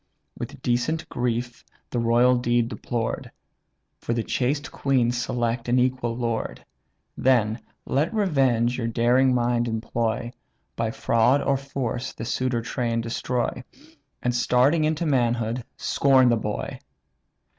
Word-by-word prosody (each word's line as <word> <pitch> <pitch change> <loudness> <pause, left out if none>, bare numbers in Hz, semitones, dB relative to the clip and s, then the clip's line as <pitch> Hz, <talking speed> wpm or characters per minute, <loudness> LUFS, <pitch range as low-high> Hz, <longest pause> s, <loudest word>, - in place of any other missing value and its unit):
With - - -8
decent 140 +7 0
grief 120 0 -2 0.3
the 120 - -1
royal 120 +2 +4
dead 120 -1 +1
deplored, 120 -2 -3 0.7
For 115 - -2
the 115 - 0
chaste 140 +5 -1
queen 130 -4 +1
select 120 -1 -2
an 125 - +3
equal 125 -2 0
lord. 115 -2 -3 0.5
Then 120 -3 +2 0.3
let 150 +8 0
revenge 135 - +2
your 115 - -1
daring 120 +3 +3
mind 120 0 +1
employ, 115 +1 -2 0.4
By 115 -1 -1
fraud 115 +5 +2
or 140 - +2
force 130 -3 -3
the 115 - -6
suitor 125 -1 -1
train 115 -1 -1
destroy, 120 +2 -2 0.6
And 125 - +1
starting 125 +6 +3
into 155 +2 0
manhood, 120 -4 +1
scorn 130 -2 +4
the 120 - +4
boy. 105 -1 -4
120 Hz, 125 wpm, -25 LUFS, 115-130 Hz, 0.7 s, royal